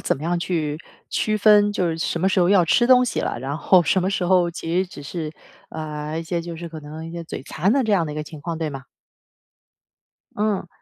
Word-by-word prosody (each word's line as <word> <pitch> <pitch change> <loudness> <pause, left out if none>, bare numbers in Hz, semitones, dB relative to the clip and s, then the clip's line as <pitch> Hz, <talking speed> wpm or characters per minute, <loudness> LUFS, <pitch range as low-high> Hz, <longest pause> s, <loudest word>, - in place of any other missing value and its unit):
怎 - - 0
么 140 - -10
样 175 +2 0
去 155 -4 -2 0.3
区 215 0 0
分 205 -1 +5
就 180 -3 0
是 165 0 -3
什 165 +1 -1
么 190 - +3
时 195 - +1
候 175 -1 +4
要 190 -3 +5
吃 240 +8 +3
东 250 0 +6
西 245 - -2
了， - - -2
然 140 +4 -4
后 180 +1 +5
什 180 +4 +2
么 185 - 0
时 195 -1 -1
候 180 -1 +3
其 165 0 -4
实 190 - +1
只 175 - -11
是， 155 +1 -5 0.4
呃 155 0 -5
一 - - -5
些 170 +1 -2
就 170 0 -7
是 170 +1 -7
可 160 -1 -8
能 155 +2 -8
一 - - -8
些 170 0 -6
嘴 160 - -7
馋 175 +8 0
的 275 +1 +3
这 220 - -1
样 175 -5 +2
的 150 - -5
一 - - -7
个 155 - -3
情 155 0 -10
况， 165 +2 -4
对 160 -2 -2
吗？ 135 -2 -8 1.5
嗯， 210 -3 -1
170 Hz, 270 characters per minute, -22 LUFS, 155-190 Hz, 1.5 s, 东